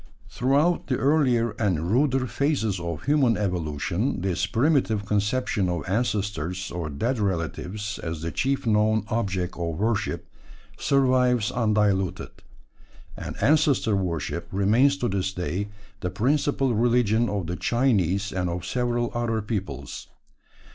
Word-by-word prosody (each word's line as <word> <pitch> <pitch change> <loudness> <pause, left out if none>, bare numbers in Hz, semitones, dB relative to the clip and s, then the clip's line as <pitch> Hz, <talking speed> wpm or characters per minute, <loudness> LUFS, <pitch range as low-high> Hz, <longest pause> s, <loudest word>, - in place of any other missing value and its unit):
Throughout 140 +8 +2
the 130 - 0
earlier 130 -6 +2
and 90 -5 0
ruder 130 +1 +2
phases 130 - 0
of 85 -3 -5
human 135 -6 +3
evolution 90 - -1
this 95 0 0
primitive 115 -3 +1
conception 105 -1 0
of 85 -5 -3
ancestors 95 -4 -1
or 85 -3 -4
dead 115 - -1
relatives 100 +2 -3
as 80 -1 -5
the 85 - -2
chief 135 0 -1
known 110 -1 +3
object 95 -6 -1
of 85 -2 -3
worship 105 -4 -1 0.5
survives 125 -4 +2
undiluted; 105 -6 +1 0.8
and - - -6
ancestor 140 -5 +3
worship 85 -2 -2
remains 115 +9 +3
to 125 - -1
this 95 -1 -1
day 90 +3 -2 0.3
the 90 - -2
principal 135 +5 +1
religion 115 -1 +2
of 100 -3 -2
the 90 +2 -3
Chinese 100 -5 +1
and 90 -1 -1
of 85 0 -4
several 120 -1 -1
other 120 -2 0
peoples. 100 - -5
105 Hz, 125 wpm, -25 LUFS, 90-125 Hz, 0.8 s, human